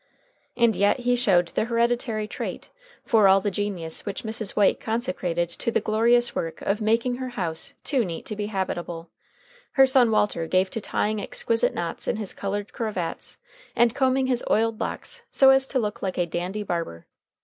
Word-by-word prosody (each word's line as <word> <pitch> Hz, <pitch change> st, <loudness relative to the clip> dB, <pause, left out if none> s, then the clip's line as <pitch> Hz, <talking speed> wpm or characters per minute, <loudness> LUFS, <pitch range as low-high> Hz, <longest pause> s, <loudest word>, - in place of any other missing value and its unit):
And 235 Hz, -2 st, +4 dB
yet 205 Hz, +5 st, +2 dB
he 245 Hz, 0 st, +2 dB
showed 185 Hz, -8 st, +3 dB
the -, -, -1 dB
hereditary 235 Hz, -2 st, 0 dB
trait, -, -, -6 dB, 0.3 s
for 220 Hz, -4 st, +4 dB
all 195 Hz, +1 st, +6 dB
the 205 Hz, +1 st, -2 dB
genius 185 Hz, -5 st, -3 dB
which 200 Hz, -1 st, -5 dB
Mrs. 220 Hz, -2 st, -3 dB
White 205 Hz, -2 st, +3 dB
consecrated 220 Hz, -8 st, -1 dB
to 175 Hz, -, -3 dB
the -, -, +2 dB
glorious 235 Hz, +3 st, +2 dB
work 165 Hz, -1 st, -4 dB
of 205 Hz, +3 st, 0 dB
making 230 Hz, +3 st, +1 dB
her 260 Hz, 0 st, -4 dB
house 190 Hz, +5 st, -2 dB
too 270 Hz, -4 st, +1 dB
neat 170 Hz, -5 st, -6 dB
to 215 Hz, -, -5 dB
be 205 Hz, 0 st, -3 dB
habitable, 175 Hz, -4 st, -4 dB, 0.6 s
her 270 Hz, -, +7 dB
son 260 Hz, -3 st, +4 dB
Walter 210 Hz, -6 st, +1 dB
gave 185 Hz, +2 st, +1 dB
to 225 Hz, -, -3 dB
tying 210 Hz, +1 st, -1 dB
exquisite 230 Hz, +3 st, -1 dB
knots 170 Hz, -1 st, -3 dB
in -, -, +1 dB
his 210 Hz, -3 st, -4 dB
colored 200 Hz, +1 st, -4 dB
cravats 210 Hz, -8 st, -4 dB, 0.4 s
and 235 Hz, -1 st, +4 dB
combing 265 Hz, 0 st, +2 dB
his 250 Hz, -2 st, 0 dB
oiled 225 Hz, 0 st, +1 dB
locks -, -, -4 dB
so 270 Hz, -1 st, +6 dB
as 265 Hz, 0 st, +3 dB
to 270 Hz, -, -2 dB
look 210 Hz, -4 st, -2 dB
like 190 Hz, -1 st, -3 dB
a 175 Hz, -, +2 dB
dandy 180 Hz, +5 st, -3 dB
barber. 170 Hz, -, -4 dB
215 Hz, 180 wpm, -25 LUFS, 185-240 Hz, 0.6 s, her